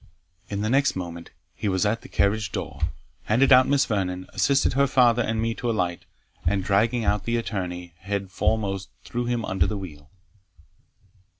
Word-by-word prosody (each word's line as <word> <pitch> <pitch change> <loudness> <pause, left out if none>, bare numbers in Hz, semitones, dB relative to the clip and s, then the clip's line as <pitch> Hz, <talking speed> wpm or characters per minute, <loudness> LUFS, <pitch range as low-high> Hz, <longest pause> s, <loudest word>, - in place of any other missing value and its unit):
In 100 0 -3
the 110 - 0
next 140 +2 +3
moment 85 -2 -6 0.2
he 105 - -4
was 95 +2 +1
at 110 +3 0
the - - -13
carriage 100 0 +1
door - - -5 0.4
handed 130 +6 +3
out 130 0 +7
Miss 140 0 +3
Vernon, 95 -3 -2
assisted 140 -2 +2
her 140 +1 +3
father 120 -3 +4
and 115 -1 -1
me 115 +1 0
to 120 +1 -3
alight, 90 -6 -1 0.4
and 95 +2 +1
dragging 110 +4 +2
out 105 +1 +1
the 115 0 0
attorney, 90 -6 -4
head 100 0 -4
foremost, 95 -2 -1
threw 120 0 -3
him 120 -2 -1
under 95 -3 +1
the 105 - -2
wheel. 75 -7 -9
105 Hz, 175 wpm, -25 LUFS, 95-120 Hz, 0.4 s, out